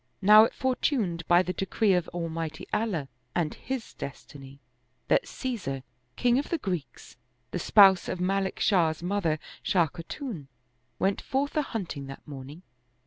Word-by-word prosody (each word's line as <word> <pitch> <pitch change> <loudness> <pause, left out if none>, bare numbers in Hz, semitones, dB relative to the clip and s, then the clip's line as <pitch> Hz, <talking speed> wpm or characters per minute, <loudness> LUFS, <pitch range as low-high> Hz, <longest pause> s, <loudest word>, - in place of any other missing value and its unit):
Now 215 +2 +9
it - - -5
fortuned 240 - 0
by 175 +1 +5
the 180 - -3
decree 195 +2 +1
of 180 -2 +1
Almighty 165 -2 -4
Allah 195 -11 0 0.3
and 165 -3 0
His 260 -3 -5
destiny, 140 0 -9 0.5
that - - +3
Caesar, 185 - -4 0.3
king 245 +1 +3
of 285 - -4
the 335 - 0
Greeks, 180 - -5 0.3
the 180 - -2
spouse 195 -1 +6
of 185 - -3
Ma 195 +2 +1
lik 190 -1 -3
Shah's 170 -5 +2
mother 175 -4 0 0.2
Shah 175 -4 +3
Khatun, 170 - -7 0.5
went 195 +1 0
forth 280 +3 -1
a 305 - +3
hunting 180 - -5
that 135 +3 -10
morning. 145 +4 -9
180 Hz, 150 wpm, -28 LUFS, 160-220 Hz, 0.5 s, Now